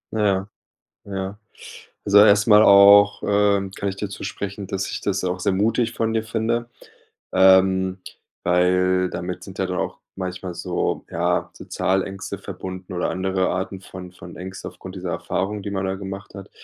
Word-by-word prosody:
Ja. 100 -2 +1 0.6
Ja. 95 0 -5 0.7
Also, 100 0 +5
erst 105 +1 +6
mal 105 0 +7
auch, 100 0 +7
ähm, 100 -1 +2
kann 100 - -4
ich 95 - -7
dir 105 -1 -4
zusprechen, 100 0 -6
dass 95 0 -3
ich - - -4
das 100 -2 -1
auch 90 0 -2
sehr 100 +2 +1
mutig 115 +4 +1
von 115 0 -1
dir 110 -1 0
finde. 115 +2 -2 0.6
Ähm, 95 0 +4 0.4
weil 90 +1 +2
damit 90 0 -5
sind 95 -1 -11
ja 95 - +1
dann 90 - -3
auch - - -3 0.2
manchmal 90 -1 -5
so - - -2
ja, 85 +1 0
so - - -12
Zahlängste 95 +1 -2
verbunden 95 0 -8
oder 90 - -1
andere 95 0 0
Arten 95 +1 -3
von 90 -1 -10
von 90 -1 -12
Ängsten 95 +1 -7
aufgrund 95 0 -11
dieser 90 -1 -4
Erfahrung, 100 +2 -2
die 100 - -4
man 95 -1 -2
da 95 0 -2
gemacht 95 +1 -8
hat, 100 - -10
95 Hz, 170 wpm, -22 LUFS, 95-100 Hz, 0.7 s, mal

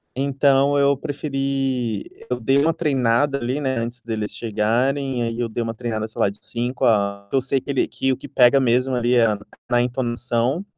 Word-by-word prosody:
Então 140 +1 +2
eu 140 0 +4
preferi 135 -4 -2 0.3
eu - - -1
dei 135 +1 +2
uma 160 +3 +3
treinada 140 -2 +1
ali, 125 +4 -2
né, 130 -3 -1
antes 120 +1 -5
deles 110 -2 -4
chegarem, 120 +4 0
aí 115 0 -3
eu 120 - -1
dei 115 +2 -2
uma 115 0 -3
treinada 110 -2 -3
sei 110 - -11
lá - - +4
de 100 - -10
5 125 +3 -2
a 100 -3 +2
porque 100 - -5
eu 135 - +3
sei 135 +1 +1
que 140 - -5
ele 135 - +1
que 135 - -1
o - - -5
que - - -10
pega 135 -1 +5
mesmo 130 +1 +2
ali 120 0 +1
é 120 -1 +5
a 105 -2 0 0.3
na 120 0 +4
entonação. 120 +4 -1
125 Hz, 205 wpm, -22 LUFS, 115-135 Hz, 0.3 s, pega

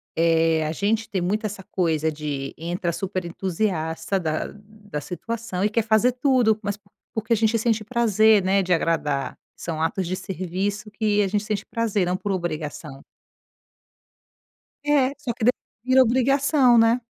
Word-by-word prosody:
eh, 165 -1 +3
a 155 - -1
gente 215 +6 -1
tem 190 - -1
muito 210 +5 -1
essa 205 -2 -5
coisa 160 -4 0
de 145 -3 -4
entra 175 +1 -2
super 185 0 -3
entusiasta 175 0 -2
da 155 -3 -2
da 205 -6 -9
situação 195 +3 -4
e 210 - +3
quer 225 +1 +1
fazer 220 +3 +3
tudo, 250 -4 +2
mas 205 -1 -3
por 200 -1 -31 0.2
porque 225 +1 0
a - - +5
gente 225 +1 +2
sente 225 -1 +1
prazer, 220 -2 +4
né, 190 +1 +2
de 180 - -4
agradar, 150 -5 0 0.2
são 160 -2 -5
atos 170 +3 -1
de 185 - -2
serviço 190 +3 -3
que 210 0 +1
a 200 - +2
gente 205 +2 -1
sente 210 -1 -3
prazer, 215 -5 0
não 180 +1 0
por 200 +2 -3
obrigação. 155 -5 -4 1.8
É, 290 -3 +3
só 280 -5 -3
que 225 - -4
depois 250 +3 +2 0.2
vira 260 +1 +5
obrigação, 260 +1 +4
né? 230 +2 +4
200 Hz, 165 wpm, -23 LUFS, 170-225 Hz, 1.8 s, a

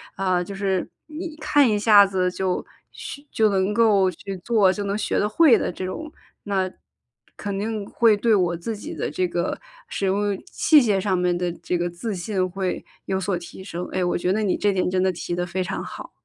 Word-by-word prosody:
啊， 185 -2 +1
就 200 - -8
是 195 -2 -1 0.2
你 315 +1 -6
看 290 -3 +4
一 210 -1 +1
下 205 -2 +7
子 185 -2 0
就 185 -1 -1 0.3
去 285 - -9
就 220 -1 +3
能 195 +1 +1
够 205 -5 +4
去 195 +3 -7
做 215 -5 +4
就 205 - -4
能 200 0 -1
学 215 - -1
得 210 - +2
会 270 -1 +6
的 - - -2
这 180 - -7
种， 310 +12 -6 0.3
那 190 -2 0 0.7
肯 200 -1 -4
定 215 -1 -3
会 230 -2 +4
对 225 +2 +2
我 175 -3 +1
自 220 +7 -4
己 - - -7
的 - - -2
这 185 - 0
个 175 0 -2 0.3
使 195 - -3
用 200 +1 +1 0.2
器 305 -2 +5
械 205 -5 +2
上 190 -1 0
面 180 -1 +1
的 180 -1 -1
这 180 - -3
个 175 0 -1
自 175 +6 -5
信 185 +1 -1
会 190 0 -3 0.2
有 190 0 -1
所 190 0 0
提 175 +2 -10
升。 180 -2 -5
哎， 185 - 0
我 175 - 0
觉 180 +1 0
得 215 - 0
你 195 - +1
这 205 - +2
点 185 - 0
真 185 0 +1
的 190 - +3
提 175 0 -4
得 175 - -1
非 185 +1 -2
常 180 - -4
好。 - - -9
195 Hz, 235 characters per minute, -23 LUFS, 180-210 Hz, 0.7 s, 下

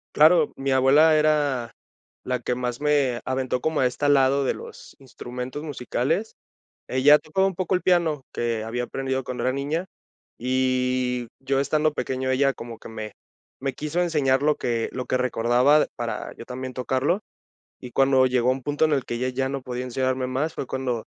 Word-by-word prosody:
Claro, 155 +1 +5
mi 135 0 -3
abuela 140 +5 +5
era 145 -6 +1 0.5
la 125 0 -1
que 125 - -2
más 125 -1 -3
me 145 -5 +1
aventó 130 -1 -1
como 160 -1 0
a 130 - +4
esta 145 +3 -1
lado 140 0 +4
de - - +1
los - - -11
instrumentos 125 +1 -7
musicales. 150 - -2 0.5
Ella 140 +4 +6
tocaba 190 +5 0
un 195 - -1
poco 185 +1 0
el - - -2
piano 170 -6 +2
que 115 -2 -1
había 120 +2 -3
aprendido 130 +1 -3
cuando 125 -1 -4
era 130 - +2
niña, 145 +7 -2 0.5
y 125 -1 0
yo 135 0 0
estando 155 +2 +1
pequeño 130 -2 -2
ella 135 +1 +2
como 115 -2 -9
que - - -12
me 110 -1 -7 0.5
me 135 -1 -2
quiso 150 +5 -3
enseñar 145 -6 +2
lo 150 0 +3
que 115 -2 -2
lo 125 0 -4
que 130 - +1
recordaba 125 +4 +3
para 120 -1 -4
yo 115 - -9
también 130 +1 -6
tocarlo. 130 - 0 0.6
Y 125 - -9
cuando 135 0 +4
llegó 125 -1 +2
un 130 0 -1
punto 145 +3 +1
en 155 - +1
el 135 -3 +1
que 120 - -4
ella 125 +2 -1
ya 130 +1 -1
no 135 -1 -3
podía 125 0 -5
enseñarme 130 0 -1
más, 135 +5 -2
fue - - -4
cuando 125 -3 -3
130 Hz, 185 wpm, -24 LUFS, 125-145 Hz, 0.6 s, Ella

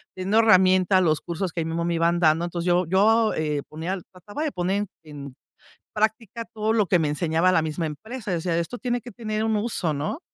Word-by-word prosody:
teniendo 190 +3 0
herramienta 185 -3 +5
los 155 -4 +2
cursos 175 +2 -4
que 170 - -2
ahí - - -3
mísmo 165 +1 -2
me 170 0 0
iban 170 +1 +2
dando. 165 0 +3
Entonces, 175 0 -4
yo 180 +1 +3
yo, 215 +5 +3
eh, 150 -2 -2
ponía 165 +5 -4
trataba 205 - -7
de 310 - -1
poner 190 +2 -1 0.2
en 145 -3 -9 0.6
práctica 220 +1 -1
todo 215 0 0
lo 215 -3 +2
que 180 0 +3
me 155 -3 0
enseñaba 160 +4 +1
la 175 - +4
misma 160 +2 -3
empresa 220 - -7
yo - - +1
decía: 165 0 -1
"Esto 170 +9 -4
tiene 245 0 -2
que 245 - -10
tener 215 -2 -3
un 220 -1 +1
uso, 205 -6 -1
¿no?" 150 - -3
185 Hz, 215 wpm, -24 LUFS, 165-215 Hz, 0.6 s, herramienta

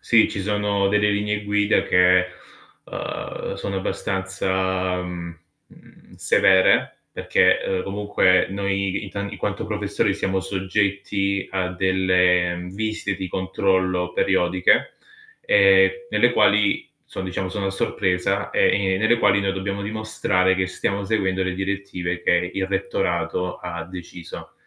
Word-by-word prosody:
Sì, 115 -2 +3
ci - - -4
sono 105 -1 0
delle 105 +1 +2
linee 105 +1 -1
guida 105 +1 +1
che, 90 0 +4 0.6
ehm, - - -6
sono 100 0 -4
abbastanza, 95 -1 -2
mhmm, 85 -1 -7 0.3
mhmm, - - -20
severe, 95 -2 +3
perché, - - +2
ehm, 95 -1 -2
comunque 100 -2 +2
noi 100 0 -2
in 100 - -8
tan 100 +1 -4
in - - -8
quanto - - -3
professori - - -1
siamo 95 0 -1
soggetti 100 0 -1
a 95 -1 -2
delle 90 -1 +1
visite 105 -1 -3
di 95 -1 -4
controllo 95 -1 0
periodiche, 95 -1 +2 0.5
ehm, 485 -1 +5 0.2
nelle - - +3
quali 320 +1 +3 0.2
so' - - -5
diciamo 95 0 -3
sono 100 +1 -3
a - - 0
sorpresa 95 0 -1
e - - +3
ne 95 -1 0
nelle 110 +3 +3
quali 100 -2 +3
noi 95 -1 0
dobbiamo 100 +1 -4
dimostrare 105 -3 0
che 95 0 0
stiamo 100 +2 -3
seguendo 95 -3 0
le 95 -1 -2
direttive 95 -2 -3
che 90 +1 +1
il 95 -1 -1
rettorato 90 -1 -2
ha 85 -2 -6
deciso. 85 -1 -10
95 Hz, 135 wpm, -22 LUFS, 90-100 Hz, 0.6 s, ehm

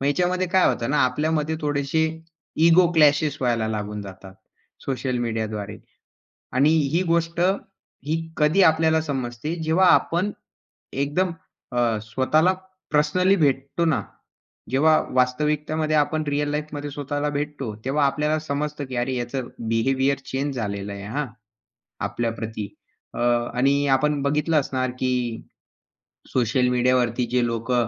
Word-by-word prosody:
मग 140 - -1
याच्यामध्ये 180 +5 +1
काय 185 +1 +4
होतं 115 +3 -1
ना, 150 - +2
आपल्यामध्ये 155 +4 0
थोडेशे 145 +1 0 0.6
इगो 170 +2 +6
क्लॅशेस 150 -2 +4
व्हायला 115 -3 +1
लागून 105 -1 -4
जातात 95 -1 -11 0.5
सोशल 130 -2 -2
मीडियाद्वारे, 110 -3 -3 0.8
आणि 140 +4 +4 0.2
ही 175 - +3
गोष्ट 170 0 0 0.7
ही 160 +1 0 0.2
कधी 155 +5 +3
आपल्याला 160 0 +4
समजते 135 +1 -3
जेव्हा 170 +4 +3
आपण 185 +5 +1 0.6
एकदम 145 +7 0 0.4
अ, 120 -2 +1
स्वतःला 145 +10 +2 0.4
पर्सनली 180 +6 +3
भेटतो 140 +1 +1
ना, 160 -4 +2 0.7
जेव्हा 155 +4 +4 0.2
वास्तविकतेमध्ये 150 +4 +1
आपण 155 +1 +1
रिअल 145 0 0
लाईफमध्ये 150 -1 -4
स्वतःला 145 +1 -2
भेटतो, 145 -6 -4
तेव्हा 145 +2 +2
आपल्याला 150 +3 +1
समजतं 150 -1 -3
की 130 -1 -7
अरे, 125 +2 0
याचं 120 +1 -3 0.2
बिहेवियर 135 +4 +1
चेंज 140 +1 -3
झालेलं 100 -3 -3
आहे, 100 0 -8
हां. 145 +6 -2 0.8
आपल्याप्रती 115 -3 -4 0.5
अ, - - -6 0.4
आणि 140 +3 +2
आपण 150 +1 0
बघितलं 150 +2 +2
असणार 130 -2 -2
की 130 - +1 1.2
सोशल 125 +1 +2
मीडियावरती 125 -1 +2
जे 125 -1 +3
लोक 115 +1 -3
140 Hz, 125 wpm, -23 LUFS, 125-155 Hz, 1.2 s, इगो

